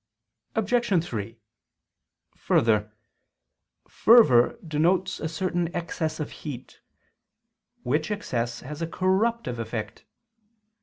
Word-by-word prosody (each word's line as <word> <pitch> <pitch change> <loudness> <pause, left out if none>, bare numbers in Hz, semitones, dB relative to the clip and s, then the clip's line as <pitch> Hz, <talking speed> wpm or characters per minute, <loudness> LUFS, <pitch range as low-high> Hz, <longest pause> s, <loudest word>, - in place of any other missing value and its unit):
Obj. 220 -5 +1
3: 115 - -5 1.0
Further, 105 -2 +1 1.0
fervor 145 - +5
denotes 165 +4 +1
a 160 - -3
certain 175 +1 -1
excess 165 -2 -3
of 150 - -4
heat; 130 -5 -9 1.0
which 150 +5 0
excess 120 - -3
has 150 +4 -8
a 165 - -1
corruptive 190 - 0
effect. 115 -1 -5
160 Hz, 90 wpm, -26 LUFS, 120-185 Hz, 1.0 s, fervor